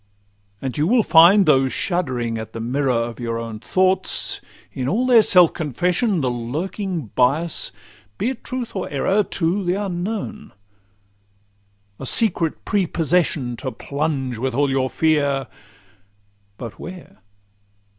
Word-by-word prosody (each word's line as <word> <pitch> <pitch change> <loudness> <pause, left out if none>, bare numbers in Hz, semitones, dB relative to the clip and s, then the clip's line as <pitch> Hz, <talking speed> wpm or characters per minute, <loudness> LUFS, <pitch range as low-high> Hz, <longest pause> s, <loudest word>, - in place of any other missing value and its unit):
And 130 +1 -3
you 150 - +2
will 235 +2 +4
find, 185 +4 +6
though 135 -4 +4
shuddering 125 - -2
at 110 - -8
the - - -6
mirror 130 +4 -1
Of 115 0 -2
your 115 -1 -3
own 115 -2 -6
thoughts, 185 - +1 0.3
in 130 0 -2
all 235 +7 +1
their 245 -3 +6
self 180 -5 +5
confession, 175 - 0
The 130 -2 0
lurking 155 - -4
bias, 145 +7 +2 0.5
be 230 - 0
it 265 - -9
truth 255 -4 -5
or 190 - -3
error, 190 +9 +1
To 185 +2 -1
the 180 0 0
unknown; 205 +3 -4 1.5
a 135 - -3
secret 170 - +1
prepossession, 165 - +1
To 130 0 -4
plunge 140 -5 -3
with 130 0 -2
all 140 0 +2
your 130 -1 0
fears—but 110 -8 -4
where? 180 0 -10
150 Hz, 130 wpm, -21 LUFS, 125-185 Hz, 1.5 s, find